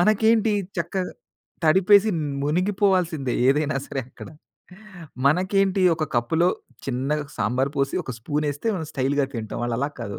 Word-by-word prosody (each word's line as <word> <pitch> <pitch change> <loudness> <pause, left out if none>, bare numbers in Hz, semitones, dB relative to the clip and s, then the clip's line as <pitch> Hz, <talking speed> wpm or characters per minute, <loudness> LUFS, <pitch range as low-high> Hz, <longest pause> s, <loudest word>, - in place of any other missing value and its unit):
మనకేంటి, 215 +2 +3 0.2
చక్కగ 180 +2 -2 0.6
తడిపేసి 195 +6 +5 0.3
మునిగిపోవాల్సిందే 180 - +1
ఏదైనా 150 +1 +2
సరే 135 - -3
అక్కడ. - - -11 1.0
మనకేంటి 190 +4 +2 0.2
ఒక 155 - -1
కప్పులో 160 +9 +2 0.4
చిన్నగా 140 +3 -1
సాంబార్ 130 +5 0
పోసి, 135 - 0
ఒక 130 - -5
స్పూనేస్తే 145 - -2
మనం 160 -3 -4
స్టైలుగా 140 +1 0
తింటాం. 110 -2 -5
వాళ్ళలాగ 125 +5 -2
కాదు. 100 -1 -6
155 Hz, 120 wpm, -24 LUFS, 135-190 Hz, 1.0 s, తడిపేసి